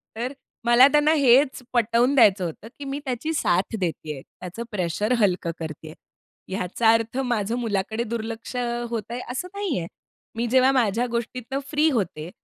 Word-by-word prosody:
तर 245 +4 -3 0.3
मला 240 +3 +7
त्यांना 295 +1 +4
हेच 270 -1 +4
पटवून 240 +3 +3
द्यायचं 205 -7 +5
होतं 170 +6 -7
की 285 - -6
मी 275 +1 -3
त्याची 260 +5 -2
साथ 190 - +1
देतीये. 155 -5 -3
त्याचं 185 - -9
प्रेशर 205 +4 -1
हलकं 180 -5 +1
करतीये. 155 -1 -7 0.6
याचा 195 +5 +1
अर्थ 230 +2 -1
माझं 235 -4 0
मुलाकडे 220 0 -1
दुर्लक्ष 230 +1 -5 0.3
होत 230 -3 -2
आहे 240 - -3
असं 260 +8 -3
नाहीये. 335 - -2 0.5
मी 235 +1 -1
जेव्हा 260 +2 +4
माझ्या 240 -2 +2
गोष्टीतनं 240 +3 -3
फ्री 305 +1 +3
होते 175 - -2
230 Hz, 150 wpm, -24 LUFS, 195-255 Hz, 0.6 s, मला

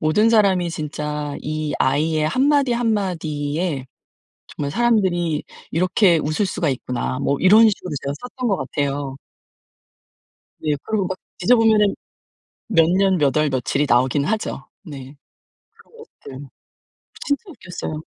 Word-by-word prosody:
'모든 210 +9 +3
사람이 190 -6 +3
진짜 150 -1 -4
이 155 0 -3
아이의 155 +3 +1
1 260 - +2
마디 280 -4 +3
1 235 -1 +1
마디에 155 -5 -2 0.6
정말 140 -1 -5
사람들이 190 -9 +1 0.3
이렇게 180 +1 +3
웃을 155 +7 -1
수가 165 -4 -1
있구나.' 130 0 -3
뭐 140 0 0
이런 215 +4 +7
식으로 180 -3 -5
제가 140 - -2
썼던 250 0 -4
것 195 - +1
같아요. 140 0 -3 1.4
네. 150 -1 0
그리고 210 -4 -1
막 185 - -4 0.2
뒤져보면은 220 -1 +4 0.7
몇 165 -7 +4
년, 190 +1 +3
몇 145 -2 +1
월, 150 -1 +3
며칠이 130 +3 0
나오긴 130 +4 +2
하죠. 220 +5 -3 0.2
네. 140 -3 -10 0.6
그런 465 - -22 0.4
것들 145 - -10 0.8
진짜 285 - 0
웃겼어요. 165 - -7
165 Hz, 260 characters per minute, -21 LUFS, 145-205 Hz, 1.4 s, 이런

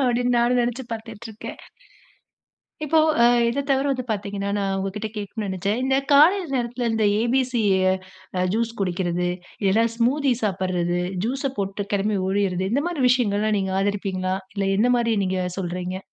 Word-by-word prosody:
அப்டின்னு 245 0 +1
நானும் 245 +1 +3
நெனச்சு 240 +2 -1
பாத்துட்டுருக்கேன். 220 -1 -8 1.3
இப்போ 315 +2 +3 0.2
அ - - +7 0.2
இத 280 +4 -1
தவிர 270 +1 +2
வந்து 255 -1 -2
பாத்தீங்கனா, 200 -1 -3
நான் 195 -1 -1
உங்கிட்ட 210 +3 -4
கேட்கனும் 210 +1 -4
நெனச்சேன். 195 +5 -1
இந்த 265 0 +2 0.2
காலை 315 +8 +7 0.2
நேரத்துல 240 -1 -1
இந்த 220 -1 +1 0.2
ஏ.பி.சி 245 -1 +1 0.9
ஜூஸ் 230 +1 0
குடிக்குறது, 180 -1 -1 0.4
இல்லன்னா 210 +4 +3
ஸ்மூதி 260 +3 +2
சாப்புறது. 180 -3 0 0.3
ஜூஸ் 265 +4 -2
ச - - -2
போட்டு 200 0 -3
கிளம்பி 205 +1 +1
ஒடிறது 190 -1 0
இந்த 280 +4 +1
மாரி 335 -6 -3
விஷயங்கள்லாம் 215 -3 +2
நீங்க 190 -1 -1
ஆதரிப்பீங்களா? 190 -2 -1 0.2
இல்ல 195 -1 0
என்ன 240 +4 +3
மாரி 230 -1 +1
நீங்க 185 0 -1 0.2
சொல்றீங்க? 180 0 -3
215 Hz, 145 wpm, -23 LUFS, 195-245 Hz, 1.3 s, அ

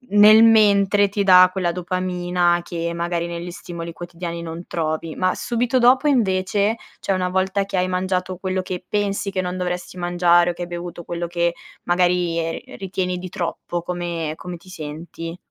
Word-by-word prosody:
nel 215 +2 +8
mentre, 205 -2 +5
ti 200 0 -1
dà 185 -1 +8
quella 180 -2 -1
dopamina 180 -1 0
che 170 -1 -3
magari 170 0 -2
negli 170 +1 -5
stimoli 170 -1 -7
quotidiani 170 0 -6
non 170 +1 -7
trovi. 160 -1 -3
Ma 185 0 +1
subito 245 +1 0
dopo 255 +4 +5
invece, 205 -3 +1 0.2
cioè - - -2
una 185 -1 0
volta 190 +2 0
che 195 - -5
hai 180 0 +1
mangiato, 185 0 -1
quello 185 0 -2
che 185 -1 -5
pensi 200 -1 -1
che 190 -1 -1
non 180 0 -4
dovresti 180 0 -4
mangiare, 175 0 +3
o - - -7
che 175 - -10
hai 175 - -3
bevuto 175 0 -6
quello 170 0 -4
che 170 0 0 0.3
magari 175 -1 +1
ri - - -9
ritieni 185 -1 -2
di 185 +1 -6
troppo, 175 -1 -4
come 170 -3 -3
come 180 0 -7
ti 170 +3 -18
senti? 165 +1 -7
180 Hz, 175 wpm, -21 LUFS, 170-190 Hz, 0.3 s, nel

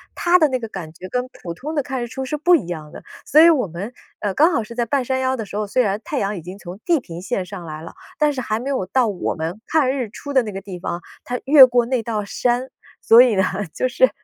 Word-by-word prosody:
它 350 +1 +4
的 310 - +5
那 260 -2 -1
个 240 - -6
感 165 -6 -8
觉 185 +3 -10
跟 250 +5 -2
普 170 - -7
通 300 - -6
的 290 - +1
看 265 -2 -4
日 240 - -3
出 265 +3 -5
是 285 +3 -3
不 350 +4 +5
一 235 - -1
样 155 -4 -7
的。 - - -10 0.2
所 305 - +6
以 335 - +8
我 275 -10 +2
们， 185 +8 -7 0.3
呃， 205 -2 -1
刚 320 - +4
好 230 - +1
是 215 - -10
在 240 0 -1
半 270 +3 0
山 260 +1 -1
腰 260 0 0
的 225 -4 -5
时 205 - -7
候， 210 -1 -2
虽 250 +5 +2
然 200 -1 -1
太 300 +1 -4
阳 200 -4 -1
已 - - -7
经 180 +4 -9
从 185 -1 -10
地 340 -2 +3
平 170 -5 -9
线 190 -1 -2
上 180 -2 -8
来 155 -1 -7
了， 165 - -10 0.2
但 300 -1 +3
是 275 - -5
还 215 -3 -1
没 250 +4 -5
有 260 -9 -1
到 245 +6 +1
我 195 -4 -2
们 165 +5 -4
看 300 -5 +2
日 260 -5 -3
出 285 +6 -8
的 260 -3 +3
那 215 - -5
个 195 - -5
地 190 -3 -8
方， 175 0 -4 0.2
它 250 0 -2
越 275 -1 +9
过 245 -1 +2
那 255 -2 0
道 220 -2 -3
山。 245 +5 -1 0.3
所 230 +2 +8
以 250 -3 +4
呢， 190 - +3 0.3
就 255 - 0
是， - - +3
240 Hz, 310 characters per minute, -21 LUFS, 190-265 Hz, 0.3 s, 越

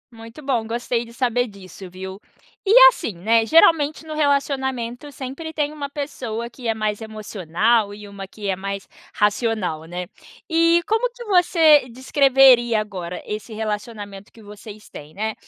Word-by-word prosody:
Muito 230 +3 -12
bom, 250 -5 -1
gostei 235 +1 -2
de 230 - -14
saber 245 0 0
disso, 195 -2 -12
viu. 190 +1 -8 0.5
E, 390 - +1 0.2
assim, 335 - -5
né, 225 +5 +2
geralmente 320 +1 +4
no 310 - -7
relacionamento 275 -3 -1
sempre 275 +4 -7
tem 300 -2 -1
uma 285 -2 -6
pessoa 250 -6 -5
que 240 0 -8
é 225 - +1
mais 215 0 -2
emocional 215 0 0
e 205 0 -10
uma 200 -1 -9
que 205 +1 -8
é 190 - +1
mais 195 +1 -6 0.3
racional, 210 -6 0
né. 175 +2 -5 0.4
E 335 +1 +3
como 450 +5 +1
que 485 0 -11
você 335 - +4
descreveria 260 -2 +4
agora 180 -4 -6
esse 215 +2 -6
relacionamento 210 -2 -6
que 225 - -17
vocês 210 +1 -12
têm, 150 +1 -11
né. 220 +2 -2
230 Hz, 155 wpm, -21 LUFS, 205-280 Hz, 0.5 s, geralmente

